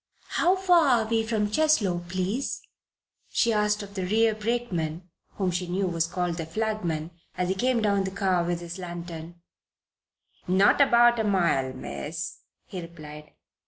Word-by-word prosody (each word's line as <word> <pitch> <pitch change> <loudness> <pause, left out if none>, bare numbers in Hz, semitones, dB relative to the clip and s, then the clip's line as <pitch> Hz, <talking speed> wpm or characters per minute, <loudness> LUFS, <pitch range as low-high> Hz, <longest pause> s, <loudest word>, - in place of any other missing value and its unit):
"How 360 +3 +3
far 355 -4 +4 0.2
are - - -6
we 225 0 +2
from 220 -2 -1
Cheslow, 210 - +2
please?" 190 +8 -2 0.7
she 230 - +2
asked 210 0 +1
of 200 0 -11
the 190 -2 -3
rear 220 +2 +3
brakeman 200 -7 -2 0.3
(whom 190 -3 0
she 180 +1 -2
knew 190 +3 -1
was 165 -2 0
called 175 -1 -2
the 165 - -3
flagman) 175 -5 -2 0.3
as 180 0 0
he - - +2
came 240 +3 +1
down 200 -2 +2
the - - -2
car 190 -2 +1
with 175 0 -2
his 170 +2 -7
lantern. 170 -1 -7 1.1
"Not 190 +8 +4
above 240 -3 +5
a - - +2
mile, 170 -10 +1
Miss," 165 +5 -6 0.3
he 185 - -6
replied. 150 -3 -11
190 Hz, 160 wpm, -26 LUFS, 170-220 Hz, 1.1 s, above